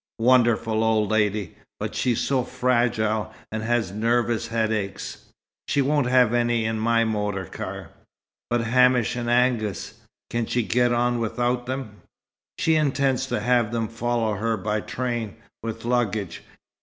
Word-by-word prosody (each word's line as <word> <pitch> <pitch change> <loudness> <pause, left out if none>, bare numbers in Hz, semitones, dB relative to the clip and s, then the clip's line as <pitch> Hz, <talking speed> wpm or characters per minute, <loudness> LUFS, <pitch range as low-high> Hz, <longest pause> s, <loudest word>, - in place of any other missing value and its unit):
"Wonderful 115 -2 +3
old 110 -2 +2
lady! 105 -4 0 0.3
But - - -4
she's 120 -3 0
so 135 -2 +1
fragile 115 -4 0 0.2
and 110 0 -3
has 115 -4 0
nervous 115 +2 0
headaches 110 -3 -2 0.2
" - - -70
"She 140 - +2
won't 145 -1 +1
have 125 -2 +4
any 120 -1 +1
in 110 0 -1
my 115 +1 +3
motor 105 -3 -2
car." - - -7 0.6
"But 120 0 +1
Hamish 125 0 +3
and 120 -1 -3
Angus. 120 -6 +1 0.4
Can 115 -1 -1
she 120 - 0
get 120 +2 +2
on 120 0 +1
without 120 +2 -1
them?" 130 -6 -5 0.6
"She 160 - +2
intends 135 -3 +1
to 105 - -2
have 120 -1 +2
them 115 -1 -1
follow 115 0 -1
her 115 +1 0
by 105 +2 -1
train, 120 -4 -3 0.3
with 115 0 -6
luggage. 110 -7 -1
115 Hz, 145 wpm, -24 LUFS, 110-125 Hz, 0.6 s, have